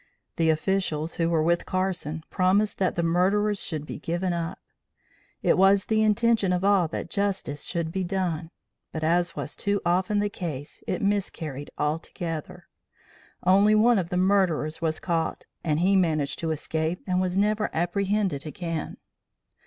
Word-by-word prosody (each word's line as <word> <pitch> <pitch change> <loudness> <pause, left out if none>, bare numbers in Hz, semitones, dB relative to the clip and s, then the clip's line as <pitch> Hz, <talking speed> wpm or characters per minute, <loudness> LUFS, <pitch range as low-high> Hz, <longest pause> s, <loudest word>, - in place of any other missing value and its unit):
The 165 -1 +3
officials 160 -1 0
who 165 - +2
were 160 -2 +2
with 170 +1 +1
Carson 180 -4 -2
promised 195 +3 +2
that 185 -2 +1
the 170 - 0
murderers 195 +5 +2
should 155 -3 -4
be - - -7
given 175 +3 -1
up. 170 -1 -3 0.9
It - - +3
was 195 +1 +5
the 220 -1 +2
intention 215 -2 +3
of 180 0 0
all 195 -4 +4
that 160 - -5
justice 195 -8 -1
should 170 -2 -2
be 190 +2 -2
done, 175 -4 -2 0.4
but, 160 - -4
as 170 +1 +1
was - - -4
too 200 -1 0
often 185 +4 +1
the 205 0 +2
case, 155 -8 -6
it - - -2
miscarried 165 -8 -2
altogether. 160 +1 -4 0.8
Only 200 +4 +5
one 225 0 +5
of 170 -2 -3
the 180 - -1
murderers 180 -5 +1
was 160 -1 0
caught 165 -2 -2 0.2
and 155 -1 +1
he 195 +2 +4
managed 155 -6 +1
to 165 - -2
escape 160 +2 -2
and 185 -1 +1
was 185 0 -1
never 210 +1 +2
apprehended 190 -2 0
again. 165 +1 -4
180 Hz, 160 wpm, -26 LUFS, 160-195 Hz, 0.9 s, was